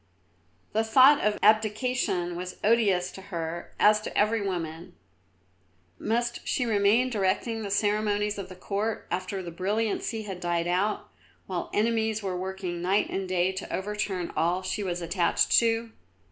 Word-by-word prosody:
The 220 +1 +2
thought 260 +6 +6
of 210 0 +1
abdication 215 -4 +2
was 180 +1 -6
odious 200 -5 +3
to 190 - -10
her, 170 -3 -5
as 210 0 +5
to - - -6
every 215 +1 +2
woman. 175 -2 -4 1.0
Must 240 +2 -1
she 250 - 0
remain 225 +3 +3
directing 220 +2 0
the 205 - -4
ceremonies 210 0 0
of 190 -2 -6
the 185 - -9
Court 205 +4 -3
after 185 +2 -3
the 170 - -6
brilliancy 215 +4 -1
had 190 -3 -6
died 175 -1 -1
out, 190 +4 0 0.4
while - - -4
enemies 220 -1 0
were 190 -2 -2
working 185 -1 -4
night 190 +4 +1
and 190 -1 -3
day 185 0 +2
to 190 0 -7
overturn 195 -3 -3
all 175 +3 +1
that 185 - -7
she - - -2
was 175 -3 -3
attached 170 +1 +1
to? 230 0 0
200 Hz, 155 wpm, -27 LUFS, 180-220 Hz, 1.0 s, thought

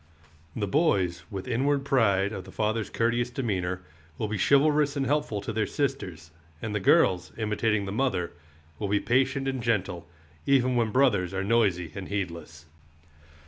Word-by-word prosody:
The 105 - -1
boys, 95 - +1
with 95 +1 -6
inward 135 +3 +1
pride 100 -7 +2
of 95 - -5
the - - -11
father's 110 0 -1
courteous 120 +1 0
demeanor, 95 -8 -2 0.3
will 110 - -2
be 105 -1 -3
chivalrous 145 +3 +3
and 140 -1 0
helpful 135 -7 0
to 110 - -4
their 110 -1 0
sisters; 95 - -3 0.3
and 110 +3 -4
the 105 - 0
girls, 95 -2 +3
imitating 105 -1 0
the 95 - -4
mother, 100 -7 0 0.5
will 105 - -2
be 105 0 +2
patient 135 +3 +1
and 135 -2 -2
gentle, 95 -7 -1 0.4
even 130 -2 +3
when 115 -2 +2
brothers 105 -8 +2
are 95 - -1
noisy 100 -6 +1
and 95 -1 -6
heedless. 85 -5 -5
110 Hz, 160 wpm, -27 LUFS, 95-130 Hz, 0.5 s, chivalrous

